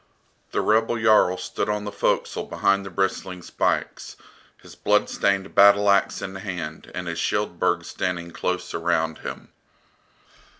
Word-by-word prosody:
The - - -1
rebel 115 +2 +2
Jarl 110 -5 +4
stood 90 - -3
on 105 0 -1
the 105 - -5
forecastle 100 - -1
behind 100 0 +1
the 95 - -7
bristling 95 -1 -2
spikes, - - -2 0.4
his - - -14
blood - - +1
stained 100 -1 0
battle 100 0 +6
axe 100 - +1
in 95 - -5
hand 90 -6 -6
and 90 - -4
his 85 0 -3
Shield 105 -3 -1
burg 90 -2 +1
standing 85 -2 -3
close 90 +2 -3
around 80 -1 0
him. - - -8
95 Hz, 145 wpm, -24 LUFS, 85-100 Hz, 0.4 s, battle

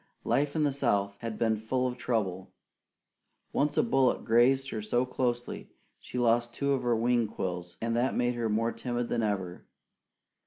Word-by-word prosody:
Life 145 +1 +1
in 155 - +2
the 145 - +2
South 100 -8 0
had 115 -2 -5
been 110 -1 +2
full 120 +4 -1
of 125 -1 -1
trouble. 100 -7 -2 1.0
Once 145 +1 +1
a - - +5
bullet 135 - +2
grazed 130 +4 +3
her 110 - -3
so 120 +4 +1
closely 120 -1 -2 0.3
she - - -8
lost 120 0 +2
two 140 +2 0
of 135 - 0
her 120 -1 +2
wing 120 0 +2
quills, 90 -3 -5
and 115 0 -1
that 120 +3 +1
made 120 0 +1
her 120 -2 -1
more 115 +2 +1
timid 120 -1 -3
than 120 - 0
ever. 95 -5 -3
120 Hz, 180 wpm, -29 LUFS, 110-125 Hz, 1.0 s, a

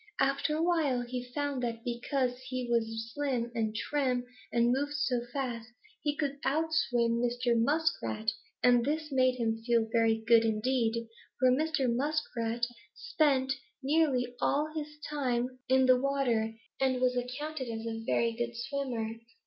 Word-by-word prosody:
After 275 +3 +2
a 320 - 0
while 315 -8 +2
he 250 +1 -4
found 285 -1 -2
that 230 -1 -3
because 250 +1 -1
he 255 -1 -3
was 225 -1 -1
slim 255 -5 -1
and 220 -2 -1
trim 255 0 0 0.3
and 235 0 +3
moved 285 +3 0
so 260 -6 +1
fast, 245 -5 -3 0.3
he 295 -1 0
could 280 -1 -2
out 320 +3 0
swim 235 -5 +2
Mr. 245 0 +1
Muskrat, 230 -4 +1 0.3
and 245 -1 +5
this 305 +3 -2
made 255 -1 +3
him 225 -2 -1
feel 230 -1 +2
very 225 -1 +3
good 230 0 +6
indeed, 230 +1 0 0.3
for 255 0 +5
Mr. 305 0 +1
Muskrat 240 -3 0 0.3
spent 285 - +2 0.3
nearly 270 -4 +2
all 300 +2 +1
his 300 -1 -5
time 255 -3 -1
in 260 0 +5
the 255 -1 +5
water 245 -5 +1 0.2
and 260 -1 +2
was 250 0 +2
accounted 260 +3 -3
a 225 0 -4
very 230 0 +1
good 235 0 -3
swimmer. 250 -2 -2
250 Hz, 150 wpm, -31 LUFS, 235-280 Hz, 0.3 s, good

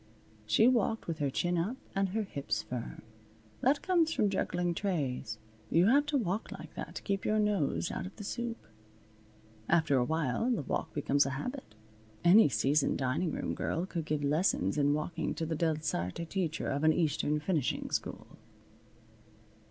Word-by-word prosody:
She 220 - +5
walked 225 -3 +2
with 165 -2 -4
her 145 -2 +1
chin 175 +5 0
up 210 +10 -2 0.2
and 195 0 +1
her 215 +4 -1
hips 140 -8 -3
firm. 125 -2 -6 0.6
That 280 +3 +2
comes 340 -4 +3
from 210 -10 +1
juggling 175 -2 0
trays. 140 - -2 0.3
You 170 +2 +4
have 285 +4 +4
to 290 -1 +1
walk 205 -3 -2
like - - -9
that - - -7
to - - -6
keep 195 -1 -1
your 215 - +1
nose 205 -7 +1
out - - -4
of 190 - -12
the 210 - -8
soup. 235 +2 -3 1.1
After 160 -5 +3
a 125 - +3
while 160 - 0
the 235 - 0
walk - - -2
becomes 145 -1 +2
a 135 0 -3
habit. 250 - -6 0.5
Any 180 +1 +7
seasoned 135 +6 +2
dining 140 +6 0
room - - -2
girl 170 +3 -2
could 170 -4 -4
give 150 -1 -1
lessons 145 - +1
in 145 0 +3
walking 160 +1 -3
to 165 - -2
the 160 0 -2
Delsarte 155 - -1
teacher 170 -3 -2
of 140 +2 -1
an 155 0 +5
Eastern 150 -2 +1
finishing 155 -4 -1
school. - - -4
170 Hz, 170 wpm, -31 LUFS, 145-205 Hz, 1.1 s, Any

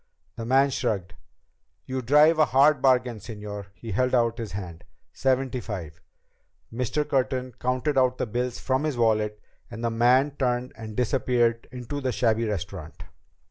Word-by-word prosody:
The 115 - -6
man 135 +2 +4
shrugged. 95 -8 -2 0.7
"You 130 0 -3
drive 150 +6 +5
a 155 - +6
hard 140 +1 +4
bargain, 125 -3 +3
señor." 105 -1 -7
He 115 - -8
held 125 +6 +1
out 115 -1 +1
his 115 -4 -5
hand. 90 -4 -7 0.3
"Seventy 130 -1 0
five." 85 -9 -7 0.7
Mr. 125 +5 -1
Curtin 130 -1 0
counted 130 +3 0
out 130 -1 +2
the - - -1
bills 125 +2 -2
from 130 +2 -1
his 150 -5 -1
wallet 105 -2 +1 0.3
and 115 0 -8
the 115 - 0
man 125 +5 +3
turned 125 -1 0
and 110 -1 -9
disappeared 120 -2 +1
into 130 +3 -5
the 130 -1 -1
shabby 115 -1 +1
restaurant. 90 -6 -5
125 Hz, 155 wpm, -26 LUFS, 110-130 Hz, 0.7 s, a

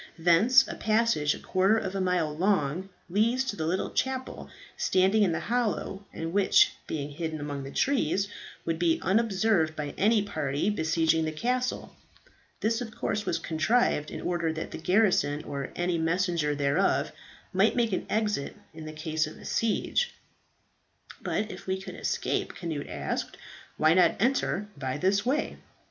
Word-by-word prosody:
Thence 195 +11 +5
a - - -5
passage 215 -9 +1
a - - -10
quarter 195 +4 +2
of 190 -3 -3
a 195 - -1
mile 180 -5 0
long 180 -1 0 0.2
leads 225 +8 +2
to 260 -6 -3
the 160 -5 -2
little 185 +3 -1
chapel 260 0 -3 0.3
standing 190 +3 +3
in 195 -4 +4
the 160 - -2
hollow, 215 -4 -2
and 165 +1 -5
which, 205 - +5 0.2
being 145 -2 -4
hidden 160 +1 -4
among 145 -1 -4
the 135 - -7
trees, 200 - +1 0.4
would 165 -1 -1
be 170 -2 +3
unobserved 195 -5 +2
by 150 -2 -4
any 210 +1 +4
party 155 -1 -1
besieging 160 -2 +1
the 155 - -2
castle. 250 +10 -2 0.7
This 225 +2 +1
of 225 -3 -6
course 210 0 -2
was - - +1
contrived 160 -2 +1
in - - -6
order 170 -2 -1
that 160 0 -5
the - - -6
garrison, 180 -5 +2
or 140 -1 -5
any 175 -1 0
messenger 165 -2 0
thereof, 140 -1 +1 0.4
might 195 +4 +3
make 235 -4 +1
an - - -2
exit 210 -9 -1 0.2
in 155 -1 -8
case 155 0 -1
of 155 - -11
siege." 230 - 0 1.1
"But 215 +1 -2
if 185 - -10
we 190 0 -1
could 190 - -8
escape," - - -2
Cnut 160 -5 -4
asked, - - -4 0.4
"why 155 +1 +4
not 175 -2 +4
enter 225 -4 +1
by 130 0 -3
this 195 +7 +1
way?" 295 +4 0
185 Hz, 160 wpm, -28 LUFS, 160-215 Hz, 1.1 s, Thence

